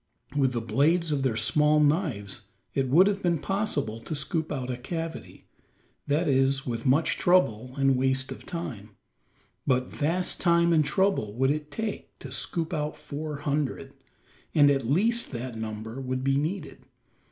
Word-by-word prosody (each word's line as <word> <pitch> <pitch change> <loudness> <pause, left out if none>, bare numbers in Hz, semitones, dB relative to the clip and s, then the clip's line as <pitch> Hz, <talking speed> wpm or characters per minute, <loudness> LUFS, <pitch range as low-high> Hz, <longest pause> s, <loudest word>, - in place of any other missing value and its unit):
With 135 -3 +2
the 120 - -1
blades 150 - +2
of 145 -2 0
their 130 -4 0
small 150 +7 +3
knives 145 - 0 0.3
it 135 -2 0
would 170 +8 +6
have 200 0 0
been 175 -3 +1
possible 150 - -2
to 155 - -5
scoop 155 +3 -1
out 130 -3 -3
a - - -2
cavity 165 +6 -6 0.6
that 150 +4 +1
is, 135 0 +2
with 115 0 -3
much 145 +5 +3
trouble 130 -9 +2
and 135 -1 +3
waste 130 +1 +1
of - - -8
time; 115 - -6 0.7
but 130 -1 +2
vast 170 +5 0
time 170 -1 +4
and 155 -2 +4
trouble 190 - 0
would 130 +2 +2
it 150 0 -3
take 220 +6 -5
to 135 - -10
scoop 165 +5 0
out 150 -1 -2
four 150 +1 -6
hundred; 145 -1 -2 0.6
and 145 -2 +6
at 135 -4 0
least 230 - +2
that 120 0 -5
number 110 +3 -5
would 130 0 -3
be 135 0 +2
needed. 155 +3 -3
145 Hz, 165 wpm, -27 LUFS, 130-165 Hz, 0.7 s, would